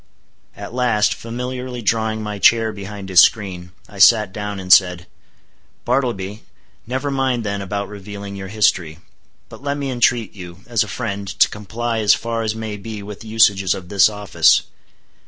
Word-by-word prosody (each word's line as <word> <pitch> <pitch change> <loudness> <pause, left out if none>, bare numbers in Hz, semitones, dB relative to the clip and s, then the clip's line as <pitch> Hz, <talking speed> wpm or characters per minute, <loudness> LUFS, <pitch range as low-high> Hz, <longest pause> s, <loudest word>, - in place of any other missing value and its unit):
At 100 +2 -9
last, 120 -4 +2
familiarly 125 +1 -6
drawing 110 0 0
my 105 -1 -5
chair 115 +2 +4
behind 100 -1 -8
his 90 -2 +7
screen, 90 -5 +1 0.2
I 100 - -13
sat 105 -1 +5
down 105 -1 -5
and 90 -1 +4
said: 90 -2 +4 0.8
"Bartleby, 110 -6 -1 0.5
never 130 +4 -2
mind 130 -3 0
then 100 -1 -3
about 100 +1 -4
revealing 100 0 -8
your 95 -1 -7
history; 95 -6 +1 0.5
but - - -13
let 140 0 -2
me 140 -2 -3
entreat 120 -3 +1
you, 90 -2 -11
as 115 -3 +1
a - - -9
friend, 100 -1 -4
to 100 - +3
comply 115 +2 -4
as 105 -2 +4
far 115 0 -3
as 110 -1 -2
may 110 -2 -5
be 105 0 -7
with 105 0 -9
the 115 - -11
usages 100 -4 +3
of 90 -2 -10
this 100 0 +5
office. 105 -3 +3
105 Hz, 170 wpm, -19 LUFS, 100-115 Hz, 0.8 s, his